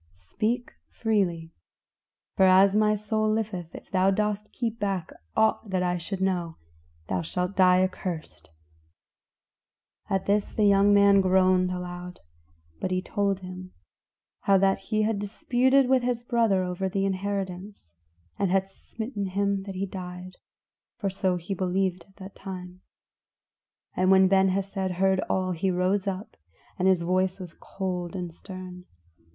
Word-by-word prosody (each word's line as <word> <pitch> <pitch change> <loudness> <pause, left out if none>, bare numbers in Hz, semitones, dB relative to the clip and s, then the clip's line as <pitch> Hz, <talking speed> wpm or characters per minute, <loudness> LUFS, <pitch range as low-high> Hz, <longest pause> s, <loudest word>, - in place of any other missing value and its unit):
Speak 220 - -3 0.2
freely, 180 -7 -1 0.8
for 190 - +5
as 190 +2 +6
my 215 0 +3
soul 215 +1 0
liveth, 200 -6 -3
if - - -11
thou 190 0 +3
dost 210 +1 -1
keep 230 -1 -3
back 195 -4 -2 0.3
aught 220 -1 +2
that 185 -1 0
I 180 0 0
should 190 +3 -5
know, 175 -4 -1 0.5
thou 90 -1 -1
shalt 180 - -3
die 185 -1 +5
accursed!" 165 - -5 1.6
At 190 -1 0
this 205 0 +1
the 215 - +2
young 200 0 +5
man 200 -1 +6
groaned 185 -1 +3
aloud; 180 0 -6 0.6
but - - -2
he 185 0 0
told 200 -1 -1
him 185 0 -9 0.7
how 195 -1 +3
that 195 0 +2
he 215 -1 +2
had 215 -1 0
disputed 250 +6 +2
with 260 0 +3
his 240 -1 -1
brother 230 -6 +2
over 180 +1 -2
the 195 +1 0
inheritance, 190 - -4 0.5
and 200 -2 +1
had 190 +1 +2
smitten 220 +1 -6
him 200 +1 0
that 195 - -6
he 190 +1 -2
died 185 -1 -8 0.6
for 200 -4 -2
so 185 -1 0
he 175 +3 -4
believed 185 -1 -1
at 195 - -26
the 190 -1 -9
time. 185 -2 -9 1.1
And 185 0 +2
when 190 0 +6
Ben 190 0 +4
Hesed 190 0 -2
heard 190 0 +3
all 185 -1 0
he 180 +2 -1
rose 185 +2 0
up, 195 +2 -5 0.4
and 185 - +2
his 185 -3 +3
voice 185 +2 0
was 180 -3 -8
cold 180 -3 -5
and 175 -3 -5
stern. 185 0 -9
190 Hz, 150 wpm, -26 LUFS, 180-200 Hz, 1.6 s, as